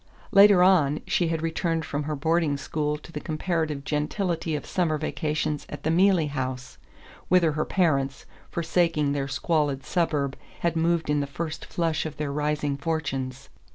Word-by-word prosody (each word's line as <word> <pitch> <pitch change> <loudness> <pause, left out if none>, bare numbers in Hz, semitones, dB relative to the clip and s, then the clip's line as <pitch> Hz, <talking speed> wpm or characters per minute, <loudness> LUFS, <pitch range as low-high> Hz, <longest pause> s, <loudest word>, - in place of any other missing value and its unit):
Later 200 -3 +7
on, 155 -6 +4
she 175 - +1
had 165 -1 -2
returned 165 0 -1
from 145 0 -3
her 150 0 -2
boarding 160 0 +1
school 150 +1 -2
to 155 - -14
the 150 - -4
comparative 155 -2 -2
gentility 160 +2 -1
of 145 - -4
summer 165 -4 0
vacations 150 -1 -2
at - - -8
the 160 - +1
Mealey 180 -1 +4
House, 130 -2 -4 0.5
whither 175 -3 +4
her 155 +1 -1
parents, 140 -7 0 0.2
forsaking 165 -3 +1
their 140 -1 -1
squalid 145 -1 0
suburb, 145 -6 0 0.3
had 170 -1 +1
moved 165 0 +1
in 150 0 +2
the 140 - -1
first 155 +3 -5
flush 165 -2 -1
of 155 - -9
their 150 -2 -2
rising 150 -1 -1
fortunes. 135 -5 -3
155 Hz, 160 wpm, -26 LUFS, 145-170 Hz, 0.5 s, Later